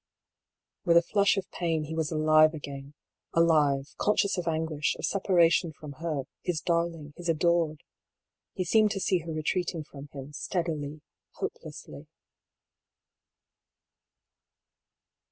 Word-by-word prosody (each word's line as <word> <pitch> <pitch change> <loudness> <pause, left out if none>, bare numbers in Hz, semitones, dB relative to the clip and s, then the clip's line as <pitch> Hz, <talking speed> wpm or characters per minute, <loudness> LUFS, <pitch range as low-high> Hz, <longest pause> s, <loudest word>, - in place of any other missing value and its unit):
With 170 -2 +5
a 170 - +6
flush 200 +3 +2
of 195 - -4
pain, 165 -3 -1
he 155 +1 -6
was 160 -1 -1
alive 155 0 +5
again; 140 -1 -8 0.4
alive, 150 -4 +3
con 210 - +2
scious 200 0 +2
of 180 -3 -3
anguish, 160 -2 0
of - - -3
separation 175 -2 +3
from 150 0 -10
her, 155 -5 -2 0.2
his 175 -3 -1
darling, 170 -2 -1
his 175 -1 -4
adored. 165 -1 +1 0.7
He 185 - -1
seemed 215 +4 +4
to 195 - -3
see 185 -1 +2
her 165 0 -7
retreating 160 +1 -1
from 145 -1 -11
him, 140 +1 -9
steadily, 155 -3 -3 0.3
hopelessly. 480 0 -7
160 Hz, 125 wpm, -28 LUFS, 150-175 Hz, 0.7 s, a